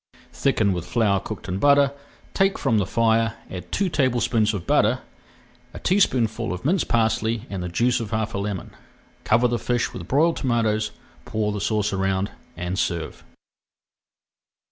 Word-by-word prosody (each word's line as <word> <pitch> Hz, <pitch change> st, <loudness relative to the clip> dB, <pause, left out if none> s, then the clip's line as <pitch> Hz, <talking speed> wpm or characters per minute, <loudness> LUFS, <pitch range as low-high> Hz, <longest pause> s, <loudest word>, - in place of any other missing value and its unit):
Thicken 110 Hz, -8 st, +1 dB
with 90 Hz, -1 st, -4 dB
flour 105 Hz, -2 st, +2 dB
cooked 105 Hz, +1 st, -7 dB
in 95 Hz, 0 st, -2 dB
butter, 140 Hz, +1 st, +5 dB, 0.4 s
take 195 Hz, 0 st, +2 dB
from 110 Hz, -, +1 dB
the 100 Hz, -, 0 dB
fire, 115 Hz, +1 st, +2 dB, 0.2 s
add 90 Hz, -1 st, -7 dB
two 200 Hz, -, +1 dB
tablespoonfuls 120 Hz, -7 st, +1 dB
of 90 Hz, -, -5 dB
butter, -, -, +2 dB, 0.7 s
a -, -, -6 dB
teaspoonful 125 Hz, -, +1 dB
of 90 Hz, +7 st, -6 dB
minced 175 Hz, +4 st, +2 dB
parsley, 110 Hz, 0 st, +1 dB
and 95 Hz, -2 st, -3 dB
the 90 Hz, -, -3 dB
juice 120 Hz, +8 st, +1 dB
of 115 Hz, -3 st, -4 dB
half 110 Hz, 0 st, -2 dB
a 100 Hz, -, -2 dB
lemon. 100 Hz, -2 st, -4 dB, 0.5 s
Cover 120 Hz, +2 st, +4 dB
the 120 Hz, -1 st, -1 dB
fish 120 Hz, -1 st, -1 dB
with -, -, -7 dB
broiled 160 Hz, +5 st, +3 dB
tomatoes, 110 Hz, -4 st, +1 dB, 0.4 s
pour 105 Hz, -1 st, -1 dB
the 105 Hz, -1 st, -4 dB
sauce 105 Hz, -1 st, 0 dB
around, 95 Hz, +1 st, 0 dB, 0.3 s
and 90 Hz, +3 st, -3 dB
serve. 85 Hz, -3 st, -2 dB
110 Hz, 160 wpm, -23 LUFS, 100-120 Hz, 0.7 s, butter